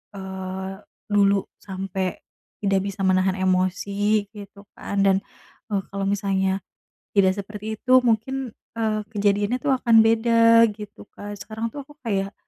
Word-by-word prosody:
eee, 190 0 -6 0.3
dulu 200 -1 +3 0.2
sampai 190 -1 -4 0.4
tidak 195 -1 +2
bisa 200 0 -6
menahan 185 0 +2
emosi 200 +3 +1
gitu 200 -1 -12
kan 200 - -3
dan, 195 -1 +4 0.5
eee, 195 -1 +1
kalau 200 0 -2
misalnya 195 -1 0 0.6
tidak 190 -2 +5
seperti 210 +2 -6
itu 255 -1 +5
mungkin, 245 +3 0 0.3
eee, 215 -1 0
kejadiannya 205 +3 +1
tuh 285 -2 +3
akan 230 -3 +6
beda 230 0 +5
gitu 210 -1 -10
Kak, 205 0 -7
sekarang 220 +4 -4
tuh 285 -2 -7
aku 295 - -15
kayak 200 -3 -1
200 Hz, 135 wpm, -23 LUFS, 195-220 Hz, 0.6 s, akan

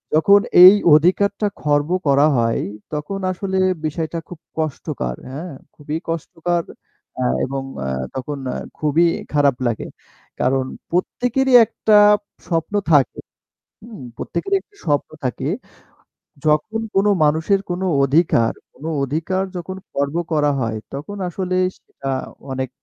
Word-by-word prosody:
যখন 200 +6 +6 0.2
এই 185 +2 +12 0.2
অধিকারটা 200 +6 +2
খর্ব 145 +1 +1 0.2
করা 140 +2 +5
হয়। 115 -1 +1 0.3
তখন 150 +7 -3
আসলে 190 +1 -3 0.3
বিষয়টা 160 +2 -3
খুব 175 -3 -10 0.2
কষ্টকর 130 - -3
হ্যাঁ? 155 +6 -6 0.2
খুবই 150 +1 -4
কষ্টকর 170 +1 -2 0.6
আ - - +1 0.2
এবং 135 0 -4 0.2
আ - - -2 0.3
তখন 140 +2 -4 0.2
আ - - -5 0.2
খুবই 155 +3 +2 0.3
খারাপ 140 -3 +3
লাগে। 115 - -3 0.5
কারণ 130 0 +1 0.3
প্রত্যেকেরই 250 +8 0
একটা 210 0 +2 0.5
স্বপ্ন 165 +3 -1 0.2
থাকে। 145 -3 +3 0.6
হু? - - -12 0.3
প্রত্যেকেরই 395 0 -1
একটা 410 - -30
স্বপ্ন 145 -1 0
থাকে। 130 +2 -2 1.0
যখন 155 +9 +1 0.2
কোন 195 +1 +3 0.2
মানুষের 160 +6 +2
কোন 175 +1 -3 0.2
অধিকার 135 -5 +3 0.2
কোন 150 - -12 0.2
অধিকার 165 +7 -1
যখন 185 +2 -6 0.2
খর্ব 140 +3 -2 0.2
করা 145 -1 +3
হয় 115 -3 -2 0.2
তখন 155 +9 -6
আসলে 185 0 -3 0.2
সেটা 135 - -8 0.4
অনেক 130 -1 -3
155 Hz, 125 wpm, -20 LUFS, 140-185 Hz, 1.0 s, এই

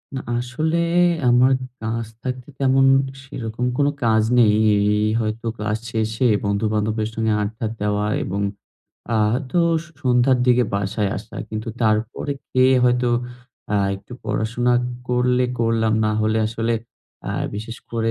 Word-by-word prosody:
না - - -2 0.2
আসলে 155 +7 -1 0.5
আমার 125 +2 +5 0.3
কাজ 115 +1 -2 0.2
থাকতে 130 -1 -4
তেমন 135 0 +4 0.4
সেরকম 120 -3 -4
কোন 145 - +3 0.2
কাজ 110 -1 +3 0.2
নেই। 110 -3 +5 0.5
এই 110 - +1
হয়তো 110 +1 -3
ক্লাস 105 0 -1
শেষে 110 +2 0 0.2
বন্ধুবান্ধবের 105 +1 0
সঙ্গে 110 -1 0
আড্ডা 110 +2 -3 0.2
দেওয়া 105 0 0 0.2
এবং 100 +1 -3 0.7
আ - - +3 0.2
হয়তো 130 +5 -1 0.4
সন্ধ্যার 125 0 +3
দিকে 125 0 +4
বাসায় 100 +1 -1
আসা। 110 +3 -9
কিন্তু 110 +1 -5
তারপরে 110 +6 0 0.2
খেয়ে 130 +1 +4
হয়তো 125 0 +2 0.6
আ - - +3 0.2
একটু 100 +5 -14
পড়াশোনা 120 +2 0 0.4
করলে 125 0 +2
করলাম, 115 -1 +1
না 110 - +2
হলে 110 +1 +1
আসলে 115 +1 -1 0.6
আ - - -2 0.2
বিশেষ 110 +3 -6
করে 115 -1 0
115 Hz, 135 wpm, -21 LUFS, 110-125 Hz, 0.7 s, আমার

